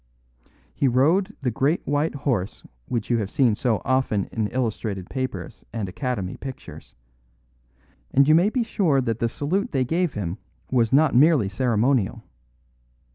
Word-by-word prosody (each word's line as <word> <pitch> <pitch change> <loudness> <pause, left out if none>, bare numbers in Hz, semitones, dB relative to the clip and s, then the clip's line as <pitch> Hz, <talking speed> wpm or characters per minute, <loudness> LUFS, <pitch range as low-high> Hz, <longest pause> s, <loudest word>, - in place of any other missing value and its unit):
He 140 - +1
rode 165 - +2
the 125 - +1
great 140 +8 0
white 145 +2 0
horse 125 -9 -2 0.2
which 115 -1 -2
you 120 - +3
have 100 -3 -3
seen 130 -5 +3
so 110 0 -1
often 130 -6 +1
in 110 -2 -1
illustrated 110 -6 -3
papers 130 -10 -5
and 110 -4 -3
Academy 100 -1 -3
pictures; 135 -1 -10 1.1
and 140 - +4
you 155 - +6
may 175 +6 +5
be 245 +2 0
sure 180 -10 +1
that 115 -3 -1
the 115 - +1
salute 185 - -2
they 130 -2 +1
gave 165 +3 0
him 95 0 -4 0.3
was 120 -4 +2
not 150 +3 +4
merely 135 - +4
ceremonial. 115 +1 +1
130 Hz, 150 wpm, -24 LUFS, 110-145 Hz, 1.1 s, you